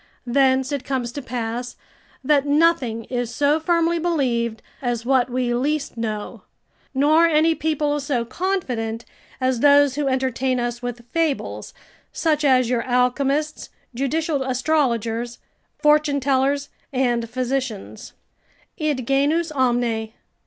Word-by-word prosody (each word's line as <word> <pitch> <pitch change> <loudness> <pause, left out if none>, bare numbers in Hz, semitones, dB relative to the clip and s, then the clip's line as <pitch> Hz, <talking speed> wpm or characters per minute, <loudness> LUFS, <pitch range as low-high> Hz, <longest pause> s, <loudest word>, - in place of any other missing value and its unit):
Thence 265 +1 +2
it 280 -3 -2
comes 255 -3 -2
to 285 - -6
pass, 245 0 -4 0.5
that 285 +1 +2
nothing 285 -7 +2
is 245 0 -3
so 290 +5 +2
firmly 335 +1 +1
believed, 245 -9 -1 0.2
as 240 -3 -2
what 255 -1 +2
we 250 -1 -1
least 280 +3 -1
know; 215 -2 -4 0.5
nor 310 +5 +5
any 320 0 +3
people 300 -2 -1
so 270 -5 -1
confident, 245 - -2 0.3
as 255 -2 +1
those 285 0 +5
who 290 0 -1
entertain 260 -1 0
us 240 0 -3
with 245 -1 -6
fables, 325 -4 -1 0.4
such 310 -2 0
as 255 -3 +4
your 240 -1 0
alchemists, 275 +5 0 0.2
judicial 285 +4 -1
astrologers, 245 -4 0 0.4
fortune 300 -1 +3
tellers, 275 +1 +1 0.2
and 240 -3 0
physicians, 255 -3 -4 0.7
"Id 295 -6 -1
genus 295 +5 +1
omne." 240 -5 0
265 Hz, 120 wpm, -22 LUFS, 240-295 Hz, 0.7 s, nor